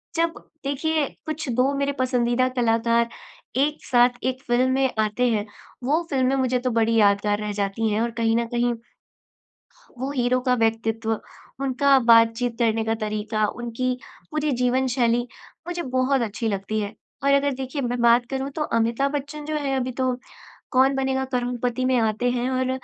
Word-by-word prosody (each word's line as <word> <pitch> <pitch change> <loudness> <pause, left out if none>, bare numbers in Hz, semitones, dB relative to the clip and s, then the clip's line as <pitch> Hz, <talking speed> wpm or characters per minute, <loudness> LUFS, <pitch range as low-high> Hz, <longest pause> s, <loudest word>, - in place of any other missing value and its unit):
जब 330 0 +1 0.3
देखिए 295 +1 0 0.2
कुछ 310 -2 -4
2 265 +3 +2
मेरे 280 0 0
पसंदीदा 250 0 +2
कलाकार 235 -1 +2 0.5
1 295 +2 +1
साथ 245 -1 +5
1 260 +1 -1
फ़िल्म 250 +1 +2
में 265 0 +2
आते 215 +4 +1
हैं, 210 -2 0 0.4
वो 300 +6 +2
फ़िल्में 265 -1 +2
मुझे 255 -1 +1
तो 255 0 -1
बड़ी 230 0 +2
यादगार 205 0 +3
रह 210 0 -3
जाती 205 +2 -1
हैं 210 +2 0
और 235 0 0
कहीं 225 0 +2
न 235 - +1
कहीं, 240 0 0 1.3
वो 265 +2 -3
हीरो 255 -1 +1
का 250 0 +2
व्यक्तित्व 225 -1 0 0.5
उनका 275 +1 +4
बातचीत 230 0 +4
करने 225 -1 +1
का 225 0 0
तरीका 215 0 -2
उनकी 240 +1 -2 0.4
पूरी 305 -1 0
जीवनशैली, 250 -1 +1 0.4
मुझे 350 0 -3
बहुत 255 0 +1
अच्छी 220 +1 -2
लगती 200 +2 -2
है। 205 +1 -4 0.3
और 280 - +4
अगर 280 0 +2
देखिए 265 +2 -4
मैं 245 0 -2
बात 235 +1 +5
करूँ 270 +1 -2
तो 305 - 0
अमिताभ 230 +5 0
बच्चन 290 +1 -4
जो 310 0 -2
हैं 275 -2 -1
अभी 255 -1 -2
तो 255 0 0 0.6
कौन 265 +1 +4
बनेगा 265 0 0
करोड़पति 245 0 -1
में 255 -1 +3
आते 225 +3 +1
हैं 245 +1 -1
और 260 0 0
250 Hz, 170 wpm, -24 LUFS, 230-265 Hz, 1.3 s, साथ